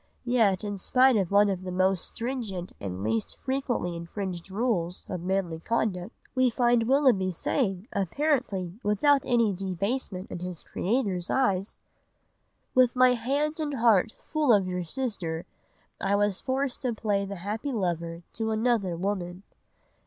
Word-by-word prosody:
Yet 220 Hz, -6 st, +3 dB
in 205 Hz, -1 st, -3 dB
spite 255 Hz, +5 st, +4 dB
of 195 Hz, -5 st, +1 dB
one 205 Hz, +1 st, +5 dB
of 190 Hz, -2 st, -1 dB
the 185 Hz, -1 st, -5 dB
most 185 Hz, 0 st, +2 dB
stringent 230 Hz, -8 st, -4 dB
and 95 Hz, -1 st, -4 dB
least 110 Hz, +1 st, -1 dB
frequently 260 Hz, -10 st, -2 dB
infringed 175 Hz, +1 st, -5 dB
rules 190 Hz, -5 st, -1 dB
of 180 Hz, -2 st, -4 dB
manly 180 Hz, -3 st, -1 dB
conduct, 205 Hz, -1 st, -1 dB, 0.2 s
we 255 Hz, -1 st, +3 dB
find 240 Hz, -1 st, +2 dB
Willoughby 255 Hz, -9 st, +4 dB
saying, 195 Hz, -, -1 dB
apparently 200 Hz, -, -1 dB
without 270 Hz, +7 st, +3 dB
any 230 Hz, -4 st, +3 dB
debasement 195 Hz, +2 st, -3 dB
in -, -, -4 dB
his 180 Hz, -2 st, -6 dB
creator's 195 Hz, -4 st, -1 dB
eyes— 200 Hz, -7 st, +1 dB, 1.0 s
"'With 255 Hz, -1 st, +4 dB
my 255 Hz, 0 st, +6 dB
hand 285 Hz, +7 st, -1 dB
and 295 Hz, -2 st, -2 dB
heart 225 Hz, -3 st, +3 dB
full 305 Hz, -5 st, +1 dB
of 200 Hz, -4 st, +4 dB
your 180 Hz, 0 st, -2 dB
sister, 175 Hz, -5 st, -3 dB, 0.6 s
I 195 Hz, +1 st, +2 dB
was 205 Hz, -1 st, +1 dB
forced 265 Hz, 0 st, -1 dB
to 250 Hz, -3 st, 0 dB
play 205 Hz, -2 st, 0 dB
the 200 Hz, 0 st, -5 dB
happy 210 Hz, +9 st, -4 dB
lover 170 Hz, -6 st, -2 dB
to 220 Hz, 0 st, -2 dB
another 220 Hz, -5 st, +1 dB
woman 185 Hz, -1 st, -3 dB
200 Hz, 145 wpm, -27 LUFS, 180-245 Hz, 1.0 s, my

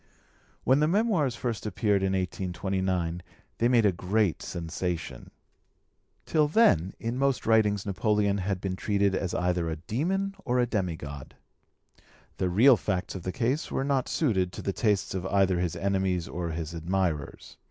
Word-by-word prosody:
When 130 Hz, +3 st, +4 dB
the 150 Hz, -, +3 dB
Memoirs 180 Hz, -, +1 dB
first 115 Hz, -3 st, -3 dB
appeared 105 Hz, -1 st, +1 dB
in 95 Hz, 0 st, 0 dB
1829 95 Hz, -1 st, -2 dB, 0.4 s
they 120 Hz, -, +3 dB
made 120 Hz, -3 st, +4 dB
a 100 Hz, -, +5 dB
great 95 Hz, +1 st, 0 dB
sensation. 85 Hz, 0 st, -4 dB, 1.0 s
Till 155 Hz, -2 st, +2 dB
then 120 Hz, -, +3 dB
in 115 Hz, +3 st, -3 dB
most 135 Hz, -2 st, +1 dB
writings 105 Hz, -3 st, +3 dB
Napoleon 100 Hz, 0 st, +1 dB
had 95 Hz, 0 st, -2 dB
been 95 Hz, -1 st, -3 dB
treated 100 Hz, 0 st, +1 dB
as 95 Hz, -1 st, -2 dB
either 90 Hz, -2 st, 0 dB
a 80 Hz, -, -2 dB
demon 175 Hz, -, -2 dB
or 125 Hz, 0 st, 0 dB
as 125 Hz, -, +4 dB
a 120 Hz, -, -2 dB
demi 90 Hz, -6 st, 0 dB
god. 75 Hz, -3 st, -9 dB, 1.0 s
The 95 Hz, -, 0 dB
real 120 Hz, +8 st, +6 dB
facts 95 Hz, -4 st, -2 dB
of 95 Hz, -, -6 dB
the 90 Hz, -, -3 dB
case 125 Hz, -, -1 dB
were -, -, -1 dB
not 135 Hz, -2 st, 0 dB
suited 95 Hz, -, +1 dB
to -, -, -7 dB
the 100 Hz, -, -1 dB
tastes 105 Hz, -3 st, 0 dB
of 95 Hz, -1 st, -3 dB
either 95 Hz, -2 st, +2 dB
his 90 Hz, -2 st, -1 dB
enemies 95 Hz, -3 st, 0 dB
or 85 Hz, +5 st, -4 dB
his 80 Hz, 0 st, -4 dB
admirers. 85 Hz, -3 st, -2 dB
95 Hz, 165 wpm, -28 LUFS, 90-115 Hz, 1.0 s, real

